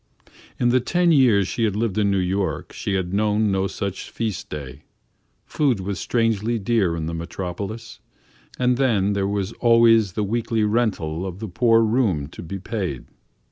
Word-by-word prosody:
In 120 - +3
the 130 +1 +4
ten 175 +7 +2
years 120 - +4
she 115 - -2
had 105 -3 +1
lived 110 -2 -1
in 105 -1 +2
New 100 - +1
York, 95 -1 -2
she 100 - -2
had 95 -1 -2
known 105 0 +1
no 95 0 +1
such 95 0 -5
feast 105 -2 -4
day. 70 -2 -7 0.6
Food 135 -8 +1
was 95 0 -4
strangely 115 -1 0
dear 100 -5 +1
in 80 -1 -3
the 85 - -4
Metropolis, 95 +6 -6 0.6
and 125 -1 +2
then 105 -7 +2
there 100 -1 0
was 100 +1 -2
always 115 -4 +5
the 105 - -1
weekly 115 +1 -1
rental 105 -7 0
of 95 -2 -5
the 110 +2 -6
poor 115 +4 +3
room 110 - +1
to - - -10
be 85 +3 -6
paid. 95 - -4
105 Hz, 175 wpm, -22 LUFS, 95-115 Hz, 0.6 s, always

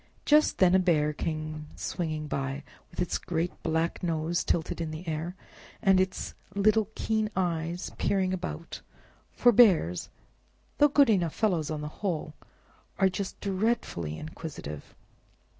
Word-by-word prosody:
Just 300 +1 +4
then 185 -1 +5
a 190 - +6
Bear 155 -5 +2
came 155 0 -4
swinging 155 -3 -3
by, 135 -1 -3 0.3
with - - -13
its 180 -1 0
great 170 0 -2
black 160 +1 0
nose 165 0 0
tilted 165 0 -1
in 165 - -2
the 155 +3 -7
air, 160 +3 -3 0.4
and 195 -3 +4
its 185 0 -2 0.2
little 215 +1 +3
keen 220 -1 0
eyes 170 -1 -1
peering 190 -2 +1
about; 180 -2 -5 0.5
for 245 - +5
bears, 185 - +4 0.7
though 295 - +7
good 280 -4 +5
enough 175 -6 +1
fellows 175 -8 +1
on 155 -1 -3
the 150 - -4
whole, 160 -6 -2 0.6
are 190 -1 +4
just 190 +1 -5
dreadfully 190 - -1
inquisitive. 150 - -8
170 Hz, 140 wpm, -28 LUFS, 155-195 Hz, 0.7 s, though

